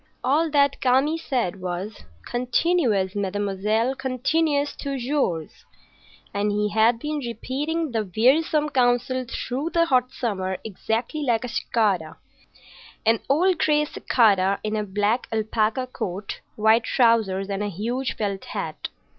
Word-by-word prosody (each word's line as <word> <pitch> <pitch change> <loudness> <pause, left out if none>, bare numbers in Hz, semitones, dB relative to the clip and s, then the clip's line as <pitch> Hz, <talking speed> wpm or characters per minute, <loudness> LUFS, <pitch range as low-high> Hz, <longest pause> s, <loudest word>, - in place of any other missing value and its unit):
All 310 +5 +2
that 285 -2 +2
Kami 265 +5 +3
said 235 - -2
was, 185 +4 -5 0.2
"Continuez, 245 - +1
mademoiselle, 205 +4 0
continuez 285 +3 0
toujours," 265 - -2 0.7
and 205 +1 0
he 210 0 0
had 220 +3 +3
been 300 +5 -3
repeating 285 +6 -3
the 225 -2 0
wearisome 300 +5 +3
counsel 250 0 +1
through 270 +6 -3
the 335 0 +2
hot 255 -5 +2
summer, 190 -6 -2
exactly 225 - -3
like 240 -4 +1
a - - -3
cicada,—an 215 +2 -2
old 345 +5 +3
gray 300 -1 +3
cicada 200 -9 +2
in 215 0 -2
a 210 - 0
black 205 +4 0
alpaca 220 +2 0
coat, 200 -5 -5 0.2
white 220 +2 +4
trousers, 220 -6 +2
and 200 0 -3
a 210 - -1
huge 235 +8 -3
felt 200 -3 -3
hat. - - -5
235 Hz, 125 wpm, -24 LUFS, 205-275 Hz, 0.7 s, white